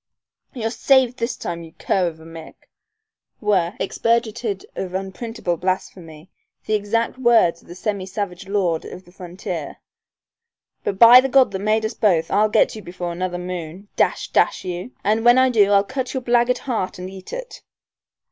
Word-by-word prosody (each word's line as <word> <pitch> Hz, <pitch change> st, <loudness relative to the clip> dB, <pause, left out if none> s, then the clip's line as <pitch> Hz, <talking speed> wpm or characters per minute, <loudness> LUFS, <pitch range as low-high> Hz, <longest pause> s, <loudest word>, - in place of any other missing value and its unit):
"You're 225 Hz, -2 st, -2 dB
saved 260 Hz, -1 st, +3 dB
this 230 Hz, +1 st, -2 dB
time, 170 Hz, -1 st, -5 dB
you 165 Hz, -1 st, -12 dB
cur 185 Hz, -2 st, 0 dB
of 160 Hz, -1 st, -6 dB
a 160 Hz, -, -14 dB
Mick," 165 Hz, -1 st, -11 dB, 0.8 s
were, 190 Hz, -5 st, +1 dB
expurgated 225 Hz, -1 st, -1 dB
of 185 Hz, -1 st, -5 dB
unprintable 195 Hz, -1 st, -4 dB
blasphemy, 180 Hz, -2 st, -4 dB, 0.3 s
the 215 Hz, -, -2 dB
exact 225 Hz, +4 st, -1 dB
words 230 Hz, -9 st, +3 dB
of -, -, -23 dB
the 175 Hz, -, -10 dB
semi 195 Hz, 0 st, -3 dB
savage 195 Hz, -2 st, -5 dB
lord 185 Hz, -5 st, 0 dB
of 185 Hz, -, -10 dB
the 175 Hz, -, -18 dB
frontier, 180 Hz, 0 st, -7 dB, 1.1 s
"but 195 Hz, -, -2 dB
by 240 Hz, +4 st, +9 dB
the 270 Hz, -, -2 dB
God 260 Hz, -4 st, +4 dB
that 190 Hz, -, -4 dB
made 215 Hz, +2 st, +1 dB
us 220 Hz, -, -3 dB
both 180 Hz, -8 st, +1 dB
I'll 215 Hz, +1 st, +3 dB
get -, -, +2 dB
you 215 Hz, -, -8 dB
before 175 Hz, -1 st, -6 dB
another 180 Hz, +1 st, -3 dB
moon, 180 Hz, +2 st, -7 dB
dash -, -, 0 dB
dash -, -, +1 dB
you, 180 Hz, +4 st, -5 dB
and 220 Hz, +2 st, +1 dB
when 240 Hz, +1 st, +6 dB
I 260 Hz, 0 st, +4 dB
do 205 Hz, -4 st, +4 dB
I'll 200 Hz, -1 st, +4 dB
cut 260 Hz, +4 st, -4 dB
out -, -, -6 dB
your 260 Hz, -, -1 dB
blackguard 240 Hz, +1 st, +2 dB
heart 225 Hz, -9 st, -3 dB
and 180 Hz, 0 st, -6 dB
eat 190 Hz, 0 st, -11 dB
it." -, -, -7 dB
200 Hz, 180 wpm, -21 LUFS, 180-230 Hz, 1.1 s, by